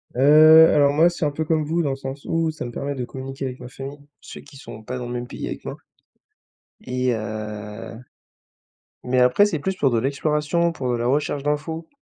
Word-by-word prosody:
Heu, 155 +4 +7
alors 145 -1 +4
moi, 155 +4 +4
c'est 170 - -3
un - - +2
peu 160 +2 -3
comme 155 0 +1
vous 165 +3 -1
dans 140 - 0
le - - -2
sens 135 +1 -8
où 165 -1 0
ça 155 -5 -6
me 120 - -6
permet 140 +3 -4
de 125 -2 -4
communiquer 135 +2 -7
avec 125 -1 -6
ma - - -9
famille. 135 +3 -9 0.2
Ceux - - -10
qui 145 -1 -16
sont 115 -5 -10
pas 125 +4 -6
dans 125 - -5
le 120 - -5
même 120 0 -4
pays - - -6
avec - - -6
moi - - -6 1.1
et 125 0 -1
heu, 105 0 -6 1.1
mais 125 0 +1
après, 125 +10 +5
c'est 180 -8 -2
plus 190 +6 -2
pour 140 - +2
de 115 -2 +1
l'exploration, 150 +5 0
pour 130 -5 -3
de 120 - 0
la 120 +1 -1
recherche 145 +1 0
d'info 160 +3 -3
140 Hz, 220 wpm, -22 LUFS, 125-155 Hz, 1.1 s, Heu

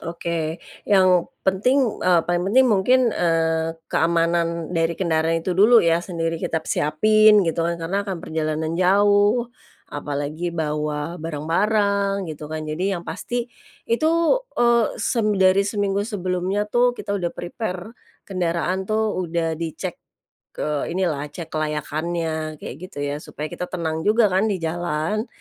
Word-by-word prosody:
Oke. 170 -1 -3 0.3
Yang 185 -3 +4 0.2
penting, 235 +6 +2
eee, 180 -2 +4
paling 175 0 0
penting 260 +4 +5
mungkin, 240 +3 +4
eee, 165 -1 0
keamanan 170 0 +1
dari 165 -1 +1
kendaraan 165 -2 0
itu 185 - -1
dulu, 215 +6 +6
ya, 170 0 +3
sendiri 165 -2 -2
kita 160 - -2
p - - -20
siapin, 215 +7 +4
gitu 165 +1 0
kan. 170 0 -1
Karena 180 +5 -1
akan 190 - -3
perjalanan 155 0 -2
jauh, 205 +5 +3 0.4
apalagi 145 +3 -3
bawa 150 +1 -2
barang-barang, 200 +5 0
gitu 150 0 -8
kan. 155 0 -4
Jadi 180 +6 -1
yang 170 - -7
pasti, 235 +8 -3 0.4
itu, 235 +8 +1 0.5
eee, 235 -2 +4
sem 230 -3 0
dari 190 +1 +5
seminggu 200 -1 0
sebelumnya 185 -1 -1
tuh, 245 +1 +3
kita 200 - -4
udah 175 -2 -2
prepare 185 +2 -5 0.3
kendaraan 185 0 -2
tuh 215 -2 0
udah 165 -1 -2
dicek 165 -2 -5 0.6
ke 150 -1 -2
inilah, 165 -5 -1
cek 160 +2 -9
kelayakannya, 155 +1 -2
kayak - - -7
gitu, 145 -7 -6
ya. 145 +1 -3
Supaya 150 0 -7
kita 180 - -5
tenang 160 -2 -3
juga 215 -1 +4
kan, 190 +4 +2
di 205 - 0
jalan. 170 +5 -2
175 Hz, 140 wpm, -22 LUFS, 160-200 Hz, 0.6 s, dulu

